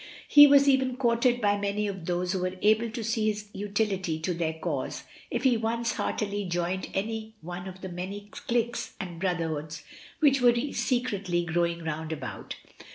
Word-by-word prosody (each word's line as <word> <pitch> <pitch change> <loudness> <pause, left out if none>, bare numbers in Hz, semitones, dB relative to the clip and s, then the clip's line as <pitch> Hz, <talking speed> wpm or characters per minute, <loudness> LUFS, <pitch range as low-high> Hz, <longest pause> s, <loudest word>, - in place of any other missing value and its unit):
He 290 0 +10
was 280 0 +6
even 260 -2 +3
courted 240 -1 +2
by 205 -1 +2
many 200 +1 -1
of 190 -4 -5
those 180 0 0
who 190 - -1
were 185 +1 -2
able 220 +2 +4
to 230 +1 -5
see 220 0 0
his 210 -1 -2
utility 200 -5 -1
to 180 +3 -1
their 165 -1 -1
cause 160 -5 -3 0.3
if - - -2
he 255 -3 +4
once 230 +1 -1
heartily 205 -1 -2
joined 175 +1 -2
any 220 +2 -3
one 180 +2 -6
of 185 0 -9
the 190 - -5
many 195 +4 -6
cliques 240 0 -2
and 175 -3 -6
brotherhoods 160 -4 -2 0.4
which 275 -4 +4
were 240 -1 +6 0.2
secretly 200 -9 0
growing 170 0 0
round 160 0 -4
about. 145 -5 -6
200 Hz, 170 wpm, -28 LUFS, 175-230 Hz, 0.4 s, He